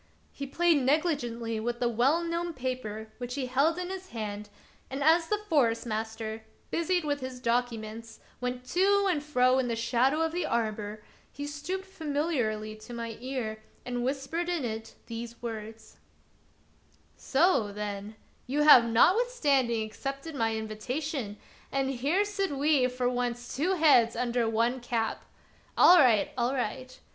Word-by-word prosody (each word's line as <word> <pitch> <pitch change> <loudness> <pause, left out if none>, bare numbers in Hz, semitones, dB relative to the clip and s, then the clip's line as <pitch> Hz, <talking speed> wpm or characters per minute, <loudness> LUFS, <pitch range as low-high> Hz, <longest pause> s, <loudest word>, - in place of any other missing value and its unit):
He 280 - -6
played 335 +1 +3
negligently 255 -6 0
with 240 +2 -3
the 245 - +1
well 260 +9 +2
known 340 0 -2
paper 235 -4 -4
which 245 0 -4
he 275 -2 -2
held 280 +7 +2
in 360 0 -4
his 375 0 -7
hand, 210 -2 -5 0.4
and 270 +2 -3
as 325 +2 +4
the 420 - +1
Forest 245 - +2
master, 220 0 -4 0.3
busied 345 0 0
with 290 -1 0
his 260 -1 -6
documents, 230 -2 -2 0.2
went 250 0 -4
to 400 +2 +3
and 340 -6 +1
fro 255 -3 +3
in 255 - 0
the 235 - -1
shadow 250 +6 +2
of 325 0 +1
the 355 +2 -1
arbor, 215 -2 -2 0.3
he 285 - -6
stooped 330 +7 -4
famil 320 -4 -2
iarly 215 -3 -1
to 240 +2 -9
my 230 -1 -5
ear 245 -4 -4 0.2
and 245 -1 -2
whispered 280 +7 -2
in 340 -7 -1
it 220 -1 -5
these 235 0 -7
words: 225 -1 -7 0.6
" - - -35
So, 270 - +2
then, 205 0 -5 0.3
you 290 +4 +1
have 275 -6 +9
notwithstanding 275 - +3
accepted 275 +8 -6
my 225 -4 0
invitation, 220 +2 -4 0.3
and 270 0 0
here 290 +11 +1
sit 400 -2 -1
we 285 -2 +3
for 250 0 -1
once 245 -1 -2
two 325 +8 +1
heads 265 -9 +5
under 240 -1 0
one 230 +3 +1
cap. 235 -2 -2 0.5
All 360 0 +8
right! 235 -8 +4
all 245 +3 +1
right 255 +1 -4
250 Hz, 155 wpm, -29 LUFS, 230-300 Hz, 0.6 s, have